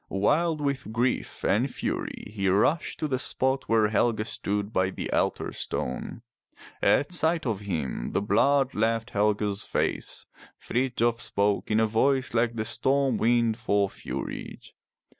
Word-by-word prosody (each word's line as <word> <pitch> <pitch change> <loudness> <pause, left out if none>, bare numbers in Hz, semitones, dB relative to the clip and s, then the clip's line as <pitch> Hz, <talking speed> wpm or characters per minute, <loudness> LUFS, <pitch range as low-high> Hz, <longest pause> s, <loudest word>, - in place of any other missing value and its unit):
Wild 155 - +1
with 140 -5 -2
grief 120 +3 -1
and - - +2
fury - - -4
he 100 -3 -1
rushed 105 - +1
to 155 - +1
the 130 -3 -1
spot 130 +1 -1
where 110 -2 +4
Helge 110 0 +1
stood 105 0 -3
by 95 -1 +2
the - - -5
altar - - 0
stone. 65 - -4 0.6
At 145 - +3
sight 165 -2 +2
of 110 -5 -1
him 80 -12 -3
the - - +1
blood 135 +6 +3
left 115 +1 0
Helge's 105 -1 +1
face. - - -2 0.3
Frithjof 120 -2 0
spoke 100 0 0
in 110 0 +3
a 110 - +4
voice 130 +4 +1
like 115 0 +1
the 110 -1 -2
storm 135 +4 +1
wind 115 -1 +2
for 100 -4 +1
fury. - - -6
115 Hz, 145 wpm, -27 LUFS, 105-130 Hz, 0.6 s, where